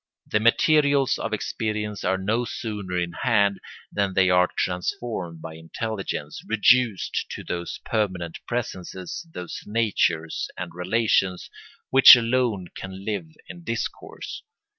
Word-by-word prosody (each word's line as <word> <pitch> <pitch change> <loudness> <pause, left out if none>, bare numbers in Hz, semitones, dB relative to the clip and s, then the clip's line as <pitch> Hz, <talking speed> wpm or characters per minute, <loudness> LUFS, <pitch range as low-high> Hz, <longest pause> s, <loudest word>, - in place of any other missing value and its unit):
The 105 - +1
materials 140 +4 +3
of 115 - -3
experience 105 -1 -3
are 95 - +1
no 110 +6 0
sooner 105 -6 -4
in 85 -1 -1
hand 100 -6 +2 0.3
than 100 -2 -1
they 95 -1 +4
are 90 0 +4
transformed 90 -2 -3
by 80 - -7
intelligence, 80 -1 -5
reduced 110 -1 +2
to - - -6
those 85 0 -4
permanent 95 -7 -2
presences, 95 - -5
those 90 - -7
natures 105 -7 0
and 85 -2 -6
relations, 95 0 0 0.4
which 135 0 +11
alone 115 -6 0
can 95 +1 -8
live 100 -6 -2 0.2
in 175 - -10
discourse. 115 -6 -5
100 Hz, 120 wpm, -24 LUFS, 90-115 Hz, 0.4 s, which